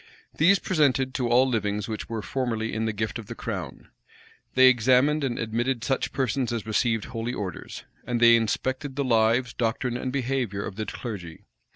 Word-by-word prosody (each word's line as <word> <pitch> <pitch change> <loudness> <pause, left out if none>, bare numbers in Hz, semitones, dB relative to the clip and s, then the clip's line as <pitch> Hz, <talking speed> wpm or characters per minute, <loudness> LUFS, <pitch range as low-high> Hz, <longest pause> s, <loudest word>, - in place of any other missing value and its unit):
These 185 +6 +5
presented 135 -8 +1
to 125 -3 -1
all 125 +2 +5
livings 105 -4 -1
which 110 -1 -5
were 110 -2 -4
formerly 115 -4 -2
in 110 +1 -1
the 110 - 0
gift 110 +2 -3
of 110 - -9
the - - -7
crown; - - -6 0.7
they 130 0 +7
examined 130 +5 +4
and 125 -3 -1
admitted 120 +2 -1
such 135 +1 -1
persons 130 -1 -1
as 115 -3 -3
received 115 0 0
holy 115 +1 -4
orders; 95 -6 -6 0.2
and 120 -1 -2
they 115 0 +7
inspected 130 +5 -1
the 140 - 0
lives, 115 0 +2
doctrine, 120 +1 -1
and 130 +1 -3
behavior 125 -6 -2
of - - -6
the 110 +1 -4
clergy. 95 -9 -7
120 Hz, 180 wpm, -26 LUFS, 110-130 Hz, 0.7 s, they